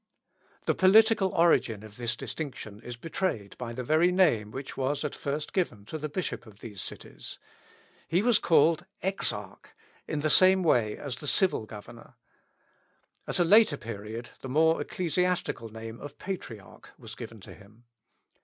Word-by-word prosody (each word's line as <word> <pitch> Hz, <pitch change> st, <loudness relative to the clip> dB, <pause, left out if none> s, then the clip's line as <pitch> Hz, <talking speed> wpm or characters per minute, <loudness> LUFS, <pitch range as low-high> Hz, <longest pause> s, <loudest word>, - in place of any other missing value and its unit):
The -, -, +3 dB
political 210 Hz, +1 st, +5 dB
origin 120 Hz, -11 st, +3 dB
of 110 Hz, +1 st, -13 dB
this 120 Hz, -2 st, -1 dB
distinction 115 Hz, -6 st, -6 dB
is 120 Hz, 0 st, -7 dB
betrayed 120 Hz, -, -3 dB
by 120 Hz, -2 st, -4 dB
the 125 Hz, +2 st, -5 dB
very 160 Hz, +7 st, +3 dB
name 155 Hz, -, +3 dB
which 135 Hz, +5 st, -7 dB
was 135 Hz, +2 st, -1 dB
at 150 Hz, -, -3 dB
first 145 Hz, +2 st, -4 dB
given 165 Hz, -, -1 dB
to 155 Hz, -, -6 dB
the 155 Hz, +1 st, -4 dB
bishop 170 Hz, -5 st, -3 dB
of 105 Hz, -2 st, -15 dB
these 105 Hz, -3 st, -8 dB
cities. -, -, -8 dB, 0.7 s
He 175 Hz, +5 st, +2 dB
was 240 Hz, -3 st, +4 dB
called 165 Hz, +2 st, +3 dB, 0.2 s
Exarch, 190 Hz, +1 st, -3 dB, 0.4 s
in 150 Hz, -2 st, -2 dB
the 155 Hz, 0 st, +2 dB
same 185 Hz, +4 st, +6 dB
way 115 Hz, -10 st, +2 dB
as 135 Hz, -4 st, -5 dB
the 150 Hz, -, -7 dB
civil 180 Hz, -, +2 dB
governor. 105 Hz, -1 st, -12 dB, 1.1 s
At -, -, 0 dB
a 175 Hz, -, +4 dB
later 205 Hz, -4 st, +6 dB
period, 115 Hz, 0 st, -7 dB
the 130 Hz, -, -7 dB
more 160 Hz, +4 st, +3 dB
ecclesiastical 180 Hz, -8 st, -1 dB
name 115 Hz, +1 st, -8 dB
of 145 Hz, 0 st, -9 dB
Patriarch 125 Hz, -, -8 dB
was -, -, -10 dB
given 115 Hz, -, -9 dB
to -, -, -11 dB
him. 105 Hz, +3 st, -18 dB
145 Hz, 160 wpm, -28 LUFS, 115-180 Hz, 1.1 s, same